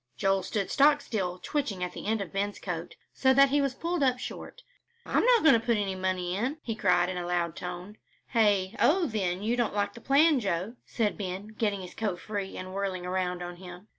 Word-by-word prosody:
Joel 195 +3 +2
stood 195 +1 -3
stock 290 +1 +5
still 190 -10 -3
twitching 200 -7 -2
the - - -7
end 220 -1 +1
of 195 - -6
Ben's 200 +1 -1
coat, 175 -2 -5 0.2
so 265 -1 +3
that 275 0 +7
he 285 +1 +2
was 275 -2 -1
pulled 340 +1 -2
up 255 -2 +3
short. - - -8 0.4
"I'm - - +1
not 485 -2 +5
going 315 - +7
to 230 -2 +2
put 235 -2 +2
any 200 -2 -1
money 185 -1 -2
in," 250 +9 -1
he 225 - -2
cried 180 -4 +2
in 180 0 -3
a 175 - -4
loud 175 -2 -1
tone. 180 +4 -7 0.3
"Hey? 205 -5 +2
Oh, 355 +3 +4
then, 195 - -2
you 230 +3 +1
don't 240 -4 0
like 205 -1 0
the 235 - -12
plan, 285 +3 +4
Joe?" 195 0 -2
said 215 -3 -1
Ben, 190 +1 -5
getting 210 -3 -1
his 180 - -9
coat 205 -5 -2
free 205 -3 -5
and 185 0 -7
whirling 190 -2 -3
around 180 -1 -2
on 175 0 -7
him. 180 +3 -11
200 Hz, 220 wpm, -28 LUFS, 180-240 Hz, 0.4 s, that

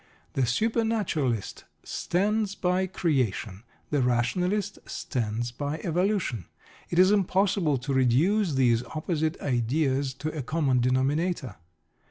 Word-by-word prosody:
The 130 -2 +1
supernaturalist 205 - 0 0.2
stands 205 +2 0
by 185 0 +1
"creation"; 125 - -1 0.3
the 145 -2 +2
rationalist 180 - 0
stands 120 -2 -3
by 145 +5 -3
"evolution." 180 - 0 0.4
It 170 - -2
is 185 +2 +6
impossible 190 -5 +2
to 135 +3 -3
reduce 150 - +2
these 120 -3 +3
opposite 155 0 -1
ideas 130 +1 0
to 155 +3 -4
a 150 - -2
common 135 -2 +1
denominator. 130 - 0
150 Hz, 110 wpm, -27 LUFS, 125-185 Hz, 0.4 s, is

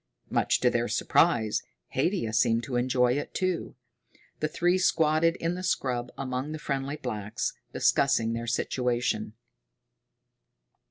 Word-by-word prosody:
Much - - +2
to - - +3
their - - 0
surprise, 110 -2 +2 0.3
Haidia 145 - 0
seemed 115 0 +3
to 125 - -4
enjoy 125 0 +2
it 145 - -4
too. 185 -2 -1 0.6
The 155 - 0
three 175 +4 +1
squatted 165 -1 +3
in 165 0 -2
the 180 - -5
scrub 125 -9 -1
among 135 +2 -3
the - - -4
friendly 140 -1 -3
blacks, 105 -6 -3 0.2
discussing 125 -5 +2
their 115 0 -4
situation. 120 -2 -1
130 Hz, 125 wpm, -28 LUFS, 120-155 Hz, 0.6 s, to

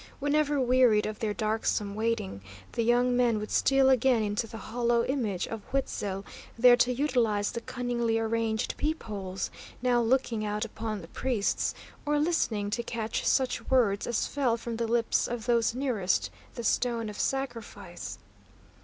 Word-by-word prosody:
Whenever 290 0 +1
wearied 250 -4 +4
of 215 0 -4
their 220 -2 -1
darksome 215 -1 -1
waiting, 215 - -2 0.3
the - - -1
young 245 +2 +3
men 240 -3 +3
would 210 0 -5
steal 270 -1 +4
again 255 -3 +4
into 210 +2 -1
the 225 - -8
hollow 235 +1 0
image 225 -9 -1
of 225 -2 -5
Huitzil', 200 -7 -2 0.3
there 245 +1 +8
to 245 +1 +2
utilise 240 -6 +1
the 235 - -5
cunningly 235 -2 -1
arranged 225 0 -1
peepholes, 205 -11 -3 0.3
now 245 -1 +2
looking 235 -2 +1
out 210 +1 -1
upon 220 -2 -5
the - - -10
priests, 240 -6 -1 0.3
or 295 0 +1
listening 245 -10 0
to 235 - 0
catch 230 -2 -3
such 260 -2 +1
words 225 -6 +2
as 240 - 0
fell 255 -5 0
from 230 0 -5
the 230 0 -1
lips 230 0 +1
of 235 -2 -4
those 235 -1 +2
nearest 240 -9 0 0.2
the 235 - -5
stone 230 -1 +1
of 210 -1 -7
sacrifice. 270 -4 -4
235 Hz, 155 wpm, -29 LUFS, 215-250 Hz, 0.3 s, there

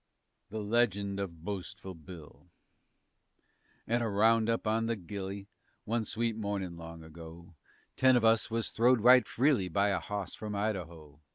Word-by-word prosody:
_"] - - -50 0.5
THE 110 +2 -4
LEGEND 100 -3 +1
OF 85 -5 -5
BOASTFUL 95 -1 -6
BILL 80 -2 -13 1.4
At 120 +1 +1
a 115 - 0
roundup 115 +2 +3
on 110 +1 +1
the 115 - 0
Gily, 100 +1 -6 0.4
One 115 0 -1
sweet 115 +1 -1
mornin' 100 -5 -3
long 85 -1 -10
ago, 85 +2 -12 0.4
Ten 130 -1 +5
of 120 -2 +3
us 110 0 +3
was 115 0 -2
throwed 120 +1 +3
right 125 +2 +7
freely 130 -7 +2
By 100 +4 +1
a 100 - 0
hawse 100 -3 -5
from 105 -1 -6
Idaho. 85 -8 -4
100 Hz, 155 wpm, -31 LUFS, 90-115 Hz, 1.4 s, right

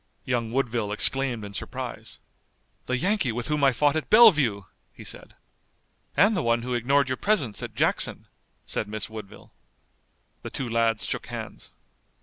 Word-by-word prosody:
Young 120 -3 -1
Woodville 120 -5 -1
exclaimed 120 0 +3
in 100 - -9
surprise. - - -5 0.7
"The 125 - 0
Yankee 185 - +1
with 120 +1 -4
whom 150 -1 0
I 135 - +6
fought 145 +4 +2
at 155 - -3
Bellevue!" 150 - +6 0.3
he - - -13
said. - - -8 0.8
"And 210 +2 +5
the 180 - 0
one 115 -2 +1
who 125 0 -3
ignored 135 +3 +2
your 130 0 -2
presence 150 - 0
at - - -7
Jackson," - - 0 0.4
said 105 - -3
Miss 110 0 -5
Woodville. 110 -3 -11 0.9
The - - -7
two 130 - -4
lads 115 -1 +1
shook - - -3
hands. - - -8
125 Hz, 155 wpm, -25 LUFS, 115-145 Hz, 0.9 s, I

